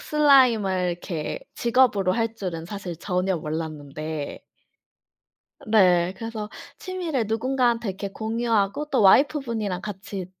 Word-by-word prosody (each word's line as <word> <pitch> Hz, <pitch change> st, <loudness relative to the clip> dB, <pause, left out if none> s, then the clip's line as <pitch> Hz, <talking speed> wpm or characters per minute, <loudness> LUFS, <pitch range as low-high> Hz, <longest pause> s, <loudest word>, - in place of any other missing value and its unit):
슬라임을 235 Hz, -12 st, +4 dB
이렇게 170 Hz, -2 st, -4 dB
직업으로 230 Hz, -6 st, +3 dB
할 230 Hz, -1 st, -1 dB
줄은 175 Hz, -6 st, -5 dB
사실 190 Hz, -3 st, -6 dB
전혀 180 Hz, +1 st, -1 dB
몰랐는데 155 Hz, -1 st, -5 dB, 1.3 s
네. 185 Hz, -4 st, +4 dB
그래서 220 Hz, -1 st, -5 dB, 0.3 s
취미를 345 Hz, -9 st, -2 dB
누군가한테 235 Hz, 0 st, 0 dB
이렇게 195 Hz, +1 st, -4 dB
공유하고 225 Hz, +2 st, 0 dB
또 260 Hz, -, +2 dB
와이프 280 Hz, +9 st, +5 dB
분이랑 215 Hz, -7 st, -3 dB
같이 195 Hz, -2 st, -6 dB
205 Hz, 290 characters per minute, -24 LUFS, 180-235 Hz, 1.3 s, 와이프